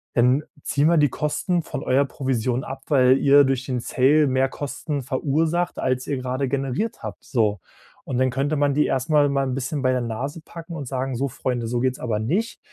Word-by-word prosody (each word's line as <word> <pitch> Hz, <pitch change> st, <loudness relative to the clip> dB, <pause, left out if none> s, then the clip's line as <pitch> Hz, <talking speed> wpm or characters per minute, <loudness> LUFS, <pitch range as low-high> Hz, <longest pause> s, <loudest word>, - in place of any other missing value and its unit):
Dann 125 Hz, +4 st, +3 dB, 0.2 s
ziehen 145 Hz, +2 st, +2 dB
wir 170 Hz, -1 st, +4 dB
die 145 Hz, -1 st, +4 dB
Kosten 165 Hz, +6 st, -1 dB
von -, -, -5 dB
eurer 135 Hz, +2 st, +3 dB
Provision 130 Hz, -2 st, -1 dB
ab, 135 Hz, 0 st, -7 dB
weil 130 Hz, -2 st, +5 dB
ihr 140 Hz, +1 st, +6 dB
durch 130 Hz, -1 st, -1 dB
den 125 Hz, -2 st, -2 dB
Sale 145 Hz, +5 st, +3 dB
mehr 130 Hz, 0 st, +2 dB
Kosten 145 Hz, +1 st, -4 dB
verursacht, 155 Hz, +7 st, 0 dB
als 130 Hz, 0 st, -1 dB
ihr 140 Hz, -, -1 dB
gerade 130 Hz, +1 st, -2 dB
generiert 135 Hz, -, -2 dB
habt, -, -, -7 dB
so. 110 Hz, -6 st, +1 dB, 0.5 s
Und 125 Hz, -, -3 dB
dann 130 Hz, -1 st, +2 dB
könnte 140 Hz, +4 st, 0 dB
man 145 Hz, -1 st, +2 dB
die 150 Hz, -, +3 dB
erstmal 145 Hz, +2 st, +2 dB
mal 140 Hz, 0 st, +1 dB
'n 130 Hz, -, -2 dB
bisschen 135 Hz, +2 st, -3 dB
bei 130 Hz, -, +3 dB
der 125 Hz, -, 0 dB
Nase 130 Hz, +7 st, -4 dB
packen 170 Hz, 0 st, -9 dB
und 145 Hz, -4 st, -5 dB
sagen: 130 Hz, 0 st, -2 dB
„So 135 Hz, +4 st, -1 dB
Freunde, 120 Hz, -1 st, -3 dB
so 120 Hz, +1 st, -1 dB
geht's 130 Hz, 0 st, 0 dB
aber 115 Hz, -4 st, -1 dB
nicht. 185 Hz, -, -1 dB
135 Hz, 205 wpm, -23 LUFS, 130-145 Hz, 0.5 s, ihr